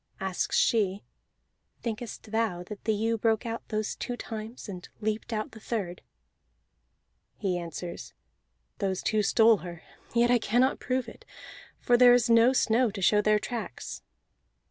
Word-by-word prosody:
Asks 190 -2 -1
she: 205 -4 +2 0.8
"Thinkest 225 -1 -5
thou 220 -6 0
that 205 +2 -10
the 220 - +2
ewe 225 +2 0
broke 225 +1 +1
out 230 0 -3
those 215 -1 -2
two 245 -1 -4
times, 225 +1 -7
and 185 -2 -8
leaped 215 +2 -2
out 215 -1 -2
the 220 - -12
third?" 200 -6 -4 1.4
He 190 -3 -1
answers: 170 +1 -7 0.6
"Those 190 -2 -1
two 215 -1 +2
stole 220 +2 +5
her, 170 -1 -9 0.3
yet 240 +1 +4
I 245 - +5
cannot 245 +5 +2
prove 255 -1 -1
it, - - -12 0.6
for 245 - +3
there 245 0 +8
is 240 -1 +2
no 230 +2 +6
snow 245 -1 +3
to 205 -1 -7
show 210 +3 +4
their 215 0 +3
tracks." 210 - -5
220 Hz, 150 wpm, -28 LUFS, 200-235 Hz, 1.4 s, there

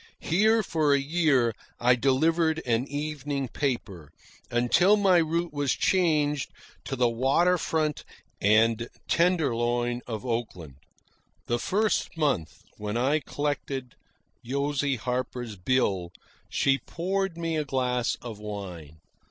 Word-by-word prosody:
Here 220 +6 +3
for 155 -5 +2
a - - +2
year 140 -5 +2 0.3
I 125 +1 +5
delivered 160 +6 +2
an 120 +2 +1
evening 145 -2 -3
paper, 100 - -3 0.4
until 125 - +4
my 195 -3 +4
route 170 0 0
was 145 -2 0
changed 150 -6 +1 0.4
to 135 - -3
the 125 -1 +3
water 135 +10 +2
front 155 -2 -1 0.4
and 115 +3 +3 0.2
tenderloin 120 -8 +1
of 110 -1 -5
Oakland. 100 - -4 0.7
The 120 0 -1
first 210 - 0
month, 140 - -1
when 105 +1 -3
I 135 +6 +2
collected 145 -4 -3 0.5
Josie 140 +2 0
Harper's 125 -1 -3
bill, 95 -3 0 0.4
she 135 0 +2
poured 185 +5 -2
me 165 -1 -2
a 155 - 0
glass 125 -3 0
of 115 -4 -7
wine. 95 -8 -7
135 Hz, 120 wpm, -27 LUFS, 120-160 Hz, 0.7 s, I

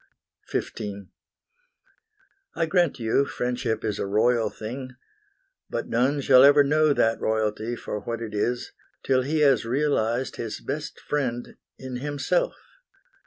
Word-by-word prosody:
XV - - -3 1.8
I 165 - +1
grant 175 -3 +2
you 115 +3 +2
friendship 125 -4 -2
is 105 -2 -2
a - - -2
royal 110 +2 +2
thing, 125 +4 -7 0.7
But - - -4
none 135 +5 +1
shall 130 -1 +7
ever 145 +1 +7
know 155 +2 +3
that 115 -5 +2
royalty 110 +1 -1
For 105 - -5
what 115 +3 -4
it 110 -2 -6
is 120 +4 -1 0.3
till 130 -1 +2
he 150 +4 0
has 135 -6 +4
realized 125 -1 0
His 115 -2 -4
best 150 +3 -5
friend 125 -5 -3 0.2
in 130 -1 -6
himself. 145 - -1
125 Hz, 130 wpm, -25 LUFS, 115-145 Hz, 1.8 s, shall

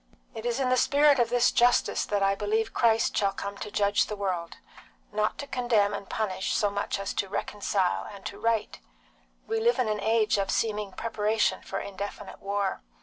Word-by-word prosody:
"It 225 +1 -5
is 240 +2 -1
in 260 -2 +1
the 255 - +3
spirit 285 +1 +4
of 235 -1 +3
this 245 0 +3
justice 245 0 +3
that 205 -1 0
I 195 0 +3
believe 215 +2 -1
Christ 225 -1 +2
shall 200 -1 +2
come 200 +1 -5
to 210 - -5
judge 205 0 +2
the 210 - -4
world; 185 -4 -3 0.5
not 210 +1 0
to 285 - -5
condemn 235 -6 +1
and 200 -1 -6
punish 190 -3 -2
so 205 -1 +2
much 200 0 -2
as 200 0 -3
to 195 - -2
reconcile 200 -2 -1
and 200 -1 -12
to - - -6
right. 230 -2 0 0.7
We 445 0 -1
live 470 +2 +2
in 250 - +1
an 210 -1 -1
age 220 -1 +2
of 195 - -1
seeming 210 -3 -1
preparation 220 -1 0
for - - -4
indefinite 200 +1 -7
war. 200 -1 -2
210 Hz, 195 wpm, -27 LUFS, 200-230 Hz, 0.7 s, spirit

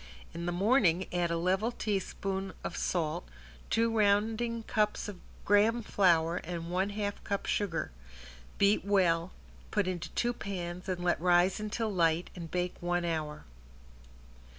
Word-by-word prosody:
In 170 +1 -4
the - - +1
morning 190 -2 +3
add 175 -1 +1
a 170 - 0
level 190 +7 +1
teaspoon 195 -3 -3
of - - -4
salt, 155 - -1 0.4
two 230 0 +2
rounding 220 +3 +2
cups 215 -1 0
of 200 -3 -7 0.3
graham 220 +4 +4
flour 170 -4 +3
and 170 -1 -5
one 190 +3 +1
half 205 0 -3
cup 200 -1 -2
sugar. 170 - -1 0.7
Beat 200 +1 +4
well, 185 -3 +2 0.4
put 205 -2 +1
into 175 -2 -3
two 240 0 +1
pans 180 -4 -5
and 180 -1 -2
let 175 -2 +1
rise 180 +2 +4
until 215 0 -2
light 165 -1 +2
and 170 -3 -7
bake 180 +1 -1
one 175 0 0
hour. 155 -3 -3
185 Hz, 145 wpm, -31 LUFS, 175-205 Hz, 0.7 s, graham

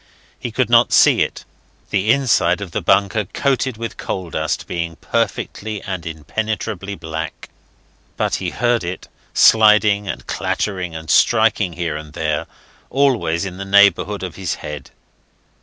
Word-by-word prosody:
He - - -4
could - - 0
not - - +4
see - - +5
it, - - -2 0.5
the 100 +1 0
inside 110 -10 +2
of 100 -4 -7
the - - -2
bunker 100 +2 +2
coated 130 +2 -1
with 115 -1 -6
coal 90 -3 -4
dust 80 -1 -2
being 85 -1 -4
perfectly 110 +5 -2
and 90 -4 -5
impenetrably 100 +4 -4
black; 80 -2 -6 0.7
but - - -1
he - - -3
heard 120 -3 0
it 90 +2 -6 0.3
sliding 105 -2 +5
and - - -5
clattering, 90 -5 -2
and 80 0 -7
striking 110 -3 +3
here 80 -3 -3
and 75 -1 -10
there, 75 -2 -2 0.4
always 120 -11 +1
in 90 -1 -6
the 100 - -5
neighbourhood 100 0 +3
of 90 -3 -6
his 95 -3 -2
head. 75 -3 -8
95 Hz, 145 wpm, -19 LUFS, 85-110 Hz, 0.7 s, see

